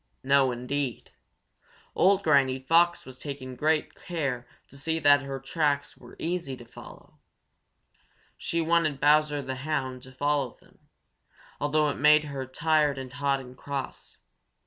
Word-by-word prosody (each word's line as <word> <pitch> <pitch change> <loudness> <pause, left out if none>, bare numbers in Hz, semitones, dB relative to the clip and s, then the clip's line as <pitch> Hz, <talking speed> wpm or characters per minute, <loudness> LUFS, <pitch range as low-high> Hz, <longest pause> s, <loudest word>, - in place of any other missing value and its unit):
No, 135 -1 +4
indeed! 125 +1 -4 0.8
Old 195 +1 +3
Granny 140 -5 +3
Fox 165 +6 +2
was 130 0 -11
taking 130 -3 -7
great 155 +4 0
care 140 -8 -4 0.2
to - - -15
see 160 +4 -2
that 145 -3 +5
her 135 -1 -5
tracks 145 -1 -1
were - - -15
easy 165 -6 -3
to 120 - -12
follow. 115 - -14 1.2
She 170 - -2
wanted 165 -3 +1
Bowser 150 0 +3
the 130 0 -5
Hound 130 -3 -3
to 130 0 -13
follow 140 -1 -1
them, - - -25 0.8
although 150 +1 +2
it - - -3
made 150 +1 +6
her 140 -3 -5
tired 150 +1 +1
and 130 -1 -7
hot 140 0 0
and 125 -1 -12
cross. 140 0 -6
140 Hz, 145 wpm, -27 LUFS, 130-155 Hz, 1.2 s, made